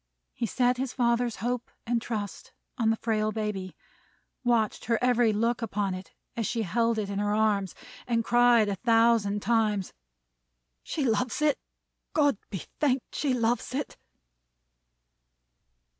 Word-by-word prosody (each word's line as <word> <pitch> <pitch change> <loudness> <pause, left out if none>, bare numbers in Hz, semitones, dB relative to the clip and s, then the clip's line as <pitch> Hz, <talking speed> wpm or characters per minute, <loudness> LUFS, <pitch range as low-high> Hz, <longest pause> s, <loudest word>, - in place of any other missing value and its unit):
He 235 - -2
set 250 +3 +2
his 260 -1 -3
father's 235 -1 +1
hope 245 0 -2 0.2
and 235 0 0
trust 210 -4 -5 0.2
on 230 -3 +1
the 225 - +3
frail 215 -1 0
baby; 210 -4 -4 0.7
watched 235 -3 +1
her 230 0 +2
every 245 -2 +3
look 230 +3 0
upon 205 -3 -1
it 185 +1 -8 0.2
as 230 -4 -1
she 230 -2 -1
held 230 +4 +1
it 210 -2 -1
in 200 - -2
her 205 0 +1
arms; 205 -4 +1 0.3
and 230 -2 +1
cried 240 -2 +5
a 200 - 0
thousand 225 -3 +3
times, 210 -3 +1 0.9
"She 295 - -2
loves 235 +3 0
it! 300 -2 +2 0.5
God 285 -8 +3
be 190 - -5 0.2
thanked, 270 -4 0
she 275 -4 0
loves 235 +1 0
it!" 285 - -3
230 Hz, 145 wpm, -28 LUFS, 210-245 Hz, 0.9 s, cried